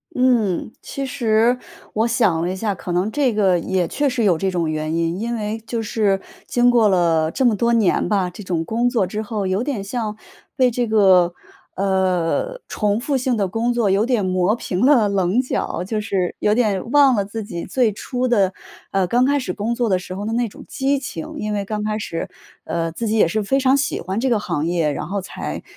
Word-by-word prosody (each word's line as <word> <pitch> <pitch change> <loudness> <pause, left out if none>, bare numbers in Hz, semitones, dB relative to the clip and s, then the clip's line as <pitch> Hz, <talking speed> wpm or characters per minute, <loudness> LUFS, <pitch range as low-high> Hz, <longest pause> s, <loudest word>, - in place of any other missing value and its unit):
嗯， 235 -8 +1
其 275 - -5
实 235 -1 +2 0.4
我 220 +2 +1
想 220 -8 +2
了 175 - -1
一 185 - -3
下， 205 0 -2
可 175 - -6
能 185 +5 0
这 270 -3 +1
个 195 -4 +3
也 180 0 -1
确 290 +1 0
实 250 -4 0
有 180 -5 +3
这 190 +2 -1
种 170 -3 -1
原 155 0 -2
因， 165 +2 -1
因 235 +2 -2
为 215 0 -3
就 230 0 -3
是 205 -3 0 0.2
经 245 0 +3
过 235 -3 +4
了 165 -4 +2
这 265 - -1
么 230 -3 +4
多 235 +3 +1
年 220 -6 +2
吧， 185 -2 +1
这 195 +4 -10
种 175 -3 -1
工 230 +7 0
作 235 -7 +1
之 210 +4 -4
后， 210 -3 -3
有 190 +5 0
点 255 -8 -3
像 215 0 -3 0.4
被 255 -2 +4
这 245 0 -1
个， 190 -5 +4 0.4
呃， 190 - 0
重 210 0 0
复 275 +1 0
性 255 -1 0
的 200 -3 0
工 230 +5 -1
作 235 -4 +1
有 200 +4 +2
点 240 -5 +1
磨 185 +3 +1
平 195 0 -1
了 240 -8 +5
棱 195 +4 +2
角， 250 -8 -2
就 215 +3 -2
是 195 -4 -1
有 210 - +2
点 220 -1 0
忘 280 -3 +6
了 200 -2 0
自 215 +2 -5
己 175 -5 -6
最 245 -5 +1
初 250 +5 -3
的 200 -6 +2 0.4
呃， 190 -2 +1
刚 245 +7 +3
开 285 +1 +2
始 255 - -3
工 220 +3 -2
作 235 -1 0
的 185 - +3
时 180 0 -7
候 200 +3 -5
的 225 - -2
那 240 0 +1
种 - - -12
激 275 0 0
情。 255 - -6
因 210 0 -2
为 200 -1 -2
刚 210 +1 -3
开 215 0 -1
始， 165 -6 -4 0.4
呃， 165 -1 -2
自 225 +7 -4
己 220 +1 +1
也 205 - +5
是 215 +6 -1
非 270 +7 +1
常 265 0 +4
喜 280 +1 0
欢 190 +4 -3
这 260 +2 0
个 230 - +3
行 170 -7 -2
业， 165 -4 +1
然 - - -4
后 200 +2 -2
才， 185 - -6
210 Hz, 240 characters per minute, -21 LUFS, 185-240 Hz, 0.4 s, 忘